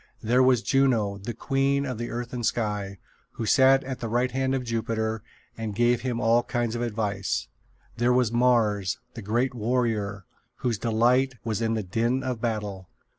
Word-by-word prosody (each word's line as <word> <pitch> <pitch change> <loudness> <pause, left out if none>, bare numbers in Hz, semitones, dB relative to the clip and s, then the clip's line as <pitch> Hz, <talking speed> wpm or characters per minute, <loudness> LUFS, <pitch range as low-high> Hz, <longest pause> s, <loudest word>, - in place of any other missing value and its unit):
There 120 +4 +3
was 130 -3 +4
Juno, 115 -7 +2
the 110 +4 -6
queen 135 +3 +1
of 125 -4 -4
earth 120 +1 -4
and 120 -1 -3
sky, 105 -4 -1 0.4
who 115 - -4
sat 135 +3 +5
at 130 -1 -5
the 115 - -4
right 125 +2 +1
hand 135 +1 0
of 130 - -2
Jupiter 110 -1 -2 0.3
and 110 -2 -5
gave 120 +1 +2
him 125 -2 -2
all 115 0 +4
kinds 120 -2 -2
of 120 - -3
advice. 105 -4 -2 0.5
There 120 +1 +2
was 125 -2 +3
Mars, 115 -6 +2 0.2
the 115 - -7
great 120 +6 0
warrior, 110 -4 -1 0.3
whose 115 -4 -2
delight 125 +3 +2
was 115 -1 -2
in 115 0 +1
the 110 - -2
din 115 +7 0
of 125 -3 -3
battle. 105 -5 -3
120 Hz, 175 wpm, -26 LUFS, 110-125 Hz, 0.5 s, sat